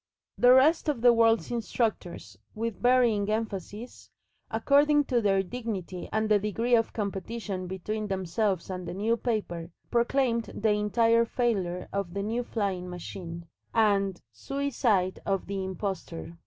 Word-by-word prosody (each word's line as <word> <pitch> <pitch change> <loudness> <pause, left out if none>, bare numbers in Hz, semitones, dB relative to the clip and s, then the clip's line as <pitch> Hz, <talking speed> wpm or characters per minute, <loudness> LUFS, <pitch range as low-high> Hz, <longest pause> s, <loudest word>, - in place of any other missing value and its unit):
The 245 - +7
rest 300 +5 +5
of 275 -6 -1
the 245 0 +7
world's 230 0 +3
instructors, 225 -6 -2 0.2
with 230 0 -4
varying 240 -5 +3
emphasis, 215 +1 -4 0.4
according 290 +1 +4
to 245 -4 +1
their 195 -2 +2
dignity 195 -4 -5
and 220 0 0
the 210 -1 +4
degree 225 +4 -1
of 225 -1 +3
competition 200 -2 -4
between 210 +4 -4
themselves 190 0 -1
and 180 -1 -5
the 175 - -5
New 220 +4 +1
Paper, 205 -8 -3 0.2
proclaimed 235 -1 +1
the 220 0 +1
"Entire 230 +3 +3
Failure 200 -8 -1
of 200 -3 -3
the 200 - -1
New 225 +4 -1
Flying 195 -6 -2
Machine," 170 -1 -7 0.3
and 200 -4 +2
"Suicide 225 - 0
of 195 -2 -1
the 195 -1 -3
Impostor." 185 -3 -5
210 Hz, 140 wpm, -28 LUFS, 190-235 Hz, 0.4 s, The